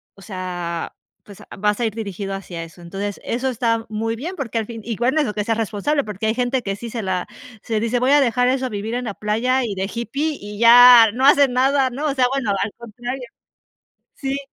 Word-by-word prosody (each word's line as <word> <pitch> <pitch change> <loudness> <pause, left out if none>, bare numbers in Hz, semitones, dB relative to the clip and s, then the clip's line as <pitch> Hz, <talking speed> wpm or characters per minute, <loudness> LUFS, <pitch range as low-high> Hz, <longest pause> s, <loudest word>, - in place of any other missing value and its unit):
o 195 - -17
sea, 180 -4 -5 0.3
pues, 200 -2 -14
a - - -15
vas 210 +2 0
a 235 - +1
ir 220 - -2
dirigido 200 -3 -5
hacia 180 -3 -6
eso. 165 +2 -13
Entonces, 195 +4 -5
eso 255 +3 -1
está 230 -2 0
muy 225 +1 -2
bien, 330 +11 -6
porque 240 -5 -4
al 225 - -1
fin 225 0 -8
igual 240 +5 0
es 305 - +3
lo 210 - -3
que 210 - -2
seas 225 +1 -1
responsable, 225 +7 -1
porque 210 0 -4
hay 220 - +1
gente 250 +1 0
que 195 -2 -3
sí, 235 +2 -7
se 230 0 -4
la 190 -2 -2 0.3
se 220 -2 -2
dice: 235 +2 0
"Voy 255 +2 +2
a 290 0 +6
dejar 245 0 +2
eso 260 0 +1
a - - -2
vivir 215 +1 -4
en 250 0 -3
la 210 - -4
playa 230 +6 0
y 210 -4 -4
de 190 +1 -3
hippie, 275 +7 -2
y 205 0 -8
ya 235 -1 +9
no 260 +3 0
hacen 280 -1 +6
nada", 265 +1 +3
¿no?, 270 +5 -5
o 285 - 0
sea, 255 -2 +3
bueno, 260 -7 -1
al 205 - -3
contrario. 240 +3 -6 0.9
Sí. 275 0 -3
230 Hz, 235 wpm, -21 LUFS, 205-255 Hz, 0.9 s, ya